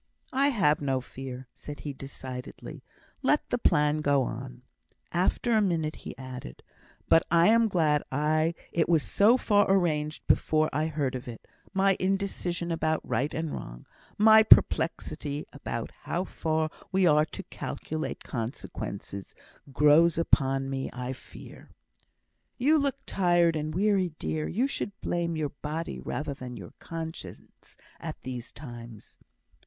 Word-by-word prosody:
"I 275 +2 +4
have 190 - +2
no 135 -2 +1
fear," 130 0 -8
said 145 -1 -8
he, 145 - -5
decidedly. 130 -2 -8 0.4
"Let - - +2
the - - +1
plan 150 0 +3
go 145 -2 +3
on." 125 +1 -6 0.5
After 185 +7 +1
a 220 -2 +4
minute, 165 -6 0
he - - -9
added, 130 - -8 0.4
"But 165 - +6
I 170 +3 +5
am 230 0 +5
glad 155 -7 +2 0.7
it 170 0 +1
was 165 -3 +4
so 220 +5 +4
far 205 -5 +3
arranged 155 -5 +1
before 155 0 +2
I 155 +3 +1
heard 145 -4 -1
of 125 -1 -6
it. 115 -2 -9 0.2
My 195 0 +3
indecision 185 -3 -1
about 160 -1 -1
right 145 +3 0
and 160 -1 -3
wrong - - -8 0.3
my 220 +1 +8
perplexity 155 -7 +3
as 140 - -11
to 115 - -3
how 175 - -2
far 160 -3 -1 0.2
we 190 0 +3
are 150 -2 +5
to - - -8
calculate 155 0 -5
consequences 105 -4 -5 0.4
grows 150 +4 +5
upon 135 -5 +2
me, 135 0 -3
I 125 +1 -4
fear." 130 - -13 0.9
"You 300 +5 +4
look 280 -1 0
tired 175 -3 +3
and 155 0 -2
weary, 190 -3 +2
dear. 155 -1 -2
You 235 +8 +1
should 205 -7 -4
blame 170 -1 -1
your 150 -2 -1
body 155 +4 -5
rather 145 -1 -3
than 125 -2 -8
your 95 -5 -10
conscience 165 0 -8 0.2
at - - -6
these 125 -2 -6
times." 120 -6 -11
155 Hz, 145 wpm, -28 LUFS, 135-180 Hz, 0.9 s, my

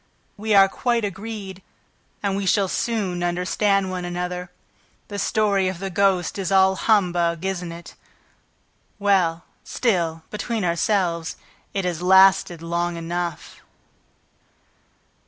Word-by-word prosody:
"We 215 0 0
are 195 -1 +8
quite 235 +2 0
agreed 200 -1 -6 0.6
and 200 -1 0
we 200 -1 -2
shall 200 0 +3
soon 195 -4 -2
understand 185 +2 +1
one 180 -1 -4
another. 180 0 -4 0.6
The 205 -1 -5
story 200 -2 +1
of 185 -1 -3
the 195 +1 -5
ghost 195 -1 +1
is 195 -1 -2
all 190 0 +5
humbug, 175 -5 +1
isn't 180 -3 -3
it?... 170 +1 -10 1.0
Well, 185 -5 +2 0.2
still 170 -9 -1
between 215 -1 -2
ourselves,... 170 -2 0 0.4
it 195 -2 -1
has 175 -2 -2
lasted 190 -2 +5
long 170 +1 -2
enough." 170 -1 -4
190 Hz, 120 wpm, -23 LUFS, 175-200 Hz, 1.0 s, are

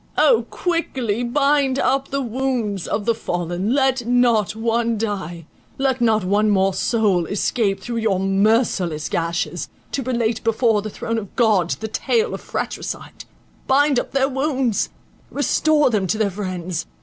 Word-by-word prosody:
O 485 - +4
quickly 260 - -1
bind 275 +1 +2
up 275 0 +1
the 275 0 -2
wounds 235 -6 -2
of 205 0 -2
the 230 - +3
fallen—let 225 +7 -1
not 240 -5 +2
one 230 0 0
die; 190 -6 -4 0.3
let 265 -2 0
not 220 -3 +3
one 205 +3 +2
more 195 -1 +2
soul 200 -8 +1
escape 200 -1 0
through 235 +4 -5
your 215 -5 +1
merciless 195 - +1
gashes, 170 +1 -2 0.2
to 275 - -2
relate 235 -3 -1
before 225 -1 +2
the 215 - -5
throne 225 +2 -3
of 200 -3 -10
God 210 -8 +3
the 220 - -2
tale 450 - 0
of - - -5
fratricide; - - -5 0.4
bind 280 0 +4
up - - -5
their 270 -1 +2
wounds—restore 280 +2 0
them 200 -4 0
to 215 - 0
their 215 -2 +1
friends. 185 -3 -4
225 Hz, 145 wpm, -21 LUFS, 200-260 Hz, 0.4 s, O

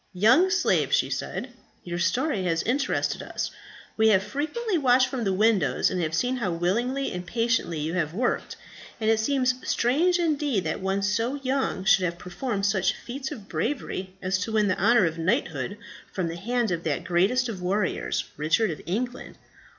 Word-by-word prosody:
"Young 255 - +5
slave," 390 +1 +2
she - - +2
said, - - -4 0.3
"your 175 0 -4
story 245 - 0
has 165 -2 0
interested 265 +4 0
us. - - -4 0.5
We 220 0 +4
have 195 -3 +4
frequently 365 - -2
watched 260 -4 +4
from 250 -3 -3
the 195 - +1
windows, 210 +1 +2
and 185 - -1
have 160 -1 -1
seen 250 +8 0
how 185 -8 -1
willingly 235 +11 0
and 180 0 -4
patiently 230 -4 0
you 155 +2 -2
have 160 -4 0
worked; 240 +8 -1 0.4
and 220 0 +2
it 220 - +2
seems 255 +2 +2
strange 320 +10 +2
indeed 295 - 0
that 160 +4 -2
one 195 +1 -1
so 225 +6 0
young 265 -7 -1
should 195 -2 +5
have 170 -1 -2
performed 195 +4 -3
such 195 -2 +2
feats 265 +2 -6
of 205 -4 -8
bravery 190 -10 -3
as 190 +1 0
to 220 +4 -3
win 210 -2 +3
the 185 - 0
honour 235 -4 +5
of 165 0 -2
knighthood 160 -1 -1 0.3
from 180 -3 -2
the 165 - -5
hand 235 +4 -1
of 170 -1 -2
that 160 +2 -1
greatest 190 +9 +2
of 205 -6 -5
warriors, 185 +1 -1
Richard 165 +7 +2
of 155 - -7
England. 245 +7 -3
210 Hz, 180 wpm, -26 LUFS, 180-255 Hz, 0.5 s, Young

